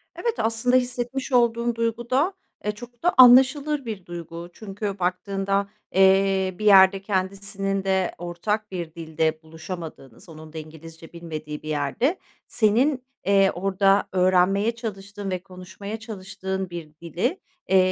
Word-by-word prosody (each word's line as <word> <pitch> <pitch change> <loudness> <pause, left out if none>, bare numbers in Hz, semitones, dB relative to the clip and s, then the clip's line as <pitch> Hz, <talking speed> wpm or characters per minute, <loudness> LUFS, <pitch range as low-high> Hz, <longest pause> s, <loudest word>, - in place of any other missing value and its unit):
Evet, 470 -1 -1
aslında 230 +3 +1
hissetmiş 250 +1 -1
olduğun 235 -1 +2
duyguda, 240 - 0 0.3
e, 210 - -1
çok 240 +4 -13
da 355 - +3
anlaşılır 265 +3 +6
bir 210 -5 -6
duygu. 170 0 -8
Çünkü 200 -1 -5
baktığında, 195 +2 -1 0.2
eee, 190 0 +3
bir 215 - -3
yerde 195 -1 +7
kendisinin 195 0 -2
de 190 -1 0
ortak 200 +5 -3
bir 170 -3 -5
dilde 160 -1 -1
buluşamadığınız 160 -4 -9
onun 155 0 -12
da - - -7
İngilizce 160 +1 -11
bilmediği 155 -3 -7
bir 155 - -7
yerde 155 - 0 0.3
senin, 250 +5 +2 0.2
eee, 195 -1 +4
orada 195 +2 +2
öğrenmeye 185 +4 +3
çalıştığın 205 -3 -6
ve 180 0 -3
konuşmaya 190 +3 -8
çalıştığın 190 -3 -5
bir 170 -3 -8
dili, 185 - -2 0.3
eee, 190 - +5
195 Hz, 130 wpm, -24 LUFS, 175-225 Hz, 0.3 s, yerde